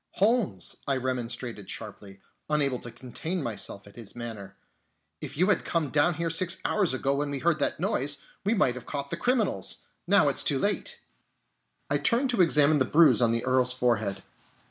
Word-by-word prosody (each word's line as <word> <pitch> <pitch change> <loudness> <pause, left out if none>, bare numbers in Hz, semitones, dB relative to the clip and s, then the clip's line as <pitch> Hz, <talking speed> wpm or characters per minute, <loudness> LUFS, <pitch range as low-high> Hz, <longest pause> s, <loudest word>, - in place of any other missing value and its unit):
"Holmes," 205 - +1
I 135 -1 +1
remonstrated 120 -5 -4
sharply, 100 -2 -8 0.3
unable 140 -4 +1
to 120 - -8
contain 130 +9 -5
myself 105 -3 -4
at 100 - -15
his 115 -4 -10
manner, 115 -4 -7 0.7
"if 140 - -6
you 180 - +4
had 200 - +2
come 165 -4 -1
down 155 +3 +3
here 165 +1 -2
six 175 +2 +2
hours 200 -5 +1
ago 135 +1 0
when 145 +1 -1
we 140 - -2
heard 160 +2 +1
that 140 - 0
noise, 145 +2 0 0.3
we 205 +4 +1
might 130 - +2
have 125 -1 -10
caught 140 -1 -5
the - - 0
criminals! 245 -2 -1 0.3
Now - - +5
it's - - +2
too - - +1
late." - - -1 0.9
And - - 0
I - - -12
turned 250 +2 +2
to 235 - +2
examine 150 -3 +5
the - - +4
bruise 155 +1 +4
on 115 -1 +4
the 115 +1 -1
Earl's 125 -1 +3
forehead. 110 -6 0
140 Hz, 190 wpm, -27 LUFS, 120-165 Hz, 0.9 s, Now